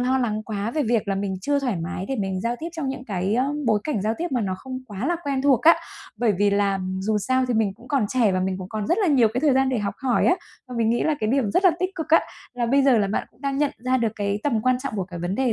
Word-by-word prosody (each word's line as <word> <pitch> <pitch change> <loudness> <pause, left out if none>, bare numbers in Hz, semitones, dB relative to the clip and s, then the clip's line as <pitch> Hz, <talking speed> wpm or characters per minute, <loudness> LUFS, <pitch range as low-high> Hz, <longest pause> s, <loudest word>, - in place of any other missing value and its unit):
lo 255 +1 +2
lắng 215 -4 -1
quá 215 0 -3
về 305 +4 0
việc 225 -3 0
là 195 - +1
mình 195 0 -2
chưa 285 +8 +1
thoải 250 -7 -1
mái 170 +2 -4
để 270 - -1
mình 190 -2 -2
giao 235 +4 -1
tiếp 330 - -4
trong 320 -5 -3
những 265 -1 -5
cái 195 -1 -1 0.3
bối 215 -2 +3
cảnh 260 -11 -1
giao 215 +2 0
tiếp 345 +2 -2
mà 250 - +1
nó 190 -3 -1
không 260 +3 -6
quá 210 +3 -4
là 345 - +1
quen 275 -2 -1
thuộc 275 -3 +4
á. 330 +1 +7 0.4
Bởi 235 -3 +2
vì 205 0 +3
là, 200 -1 +1 0.2
dù 210 +2 0
sao 260 +5 +1
thì 245 - +1
mình 215 -3 +1
cũng 240 +4 -17
còn 275 -6 +2
trẻ, 235 -5 +2
và 185 - 0
mình 185 0 -1
cũng 185 -1 -7
còn 215 -1 -3
rất 350 - +2
là 405 - +2
nhiều 260 -7 +4
cái 250 - 0
thời 290 -2 +3
gian 265 0 +3
để 255 -2 0
học 205 -1 -2
hỏi 255 -3 +2
á. 360 - +5 0.3
Và 250 - -7
mình 225 -1 +2
nghĩ 240 - +1
là 310 - +2
cái 215 - 0
điểm 255 -5 +1
rất 365 - +1
là 370 - +8
tích 370 0 0
cực 320 - -5
á, 325 - +6 0.3
là 240 -1 -1
bây 275 +4 +3
giờ 265 -4 +5
là 200 - +2
bạn 205 - -2
cũng - - -30
đang 275 -1 -2
nhận 295 -1 +2
ra 255 +2 +1
được 230 -3 0
cái 205 0 -1
tầm 235 -7 +1
quan 255 0 +3
trọng 275 -6 -4
của 190 - -1
cái 180 -1 -8
vấn 175 +3 -2
đề 255 +1 +1
235 Hz, 315 wpm, -24 LUFS, 205-270 Hz, 0.4 s, là